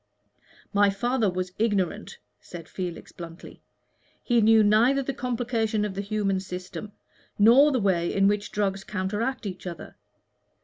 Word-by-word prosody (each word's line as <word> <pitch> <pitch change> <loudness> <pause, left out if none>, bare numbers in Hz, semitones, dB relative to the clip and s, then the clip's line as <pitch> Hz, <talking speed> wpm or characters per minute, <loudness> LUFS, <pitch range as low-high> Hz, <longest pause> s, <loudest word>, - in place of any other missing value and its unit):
"My 205 0 +4
father 230 +2 0
was 180 0 -3
ignorant," 205 -5 -1 0.2
said 170 -2 -10
Felix, 180 -3 -6
bluntly. 170 0 -11 0.6
"He 240 -2 +2
knew 220 0 +6
neither 235 +7 +4
the 275 - -3
complication 230 -4 -1
of 205 - -4
the 195 - -3
human 200 -2 -1
system, 185 +2 -7 0.4
nor 245 +8 +6
the 260 - +1
way 180 -5 +1
in 195 0 +3
which 205 +1 0
drugs 195 -1 -1
counteract 210 +6 -3
each 190 -2 -6
other. 170 -3 -8
205 Hz, 140 wpm, -26 LUFS, 190-230 Hz, 0.6 s, knew